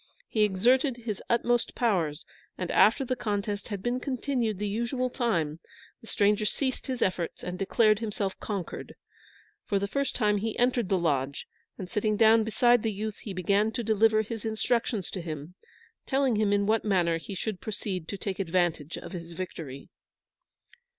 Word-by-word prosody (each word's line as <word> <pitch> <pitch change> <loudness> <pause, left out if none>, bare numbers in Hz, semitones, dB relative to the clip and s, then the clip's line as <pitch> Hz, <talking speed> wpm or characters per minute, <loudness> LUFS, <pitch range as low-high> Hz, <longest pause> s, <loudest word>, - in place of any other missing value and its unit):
He 220 - 0
exerted 245 +7 +3
his 225 -4 -5
utmost 240 0 +1
powers, 175 - 0 0.3
and 180 -2 -3
after 230 +5 +5
the 255 - -1
contest 205 -3 -2
had 200 -3 -5
been 245 +1 0
continued 250 -5 -1
the 210 +2 -2
usual 235 +4 -1
time, 170 - 0 0.4
the 225 - -14
stranger 210 0 +2
ceased 260 +6 -1
his 255 -2 0
efforts 180 -3 -2
and 180 0 -5
declared 215 +1 +3
himself 205 -4 -3
conquered. 200 -5 -5 0.7
For 200 - +1
the 200 - 0
first 275 +5 -1
time 210 -3 +2
he 220 +1 -3
entered 245 -4 +2
the 195 - +3
lodge, 140 -5 0 0.3
and 185 - -6
sitting 210 +3 0
down 225 0 +6
beside 240 +2 +4
the 225 - 0
youth, 210 +1 -4
he 210 - -7
began 200 +4 +1
to 240 - -2
deliver 220 0 +3
his 225 0 -6
instructions 220 -2 0
to 185 - -4
him, 155 0 -6 0.5
telling 270 -3 +2
him 210 -1 +2
in 200 0 +2
what 220 +2 +2
manner 175 -5 +2
he 195 +4 -7
should 190 +1 -3
proceed 195 -5 -4
to 200 - -4
take 195 -1 -4
advantage 170 -4 0
of - - -8
his 170 -2 -7
victory. 160 -6 -7
210 Hz, 170 wpm, -28 LUFS, 185-230 Hz, 0.7 s, down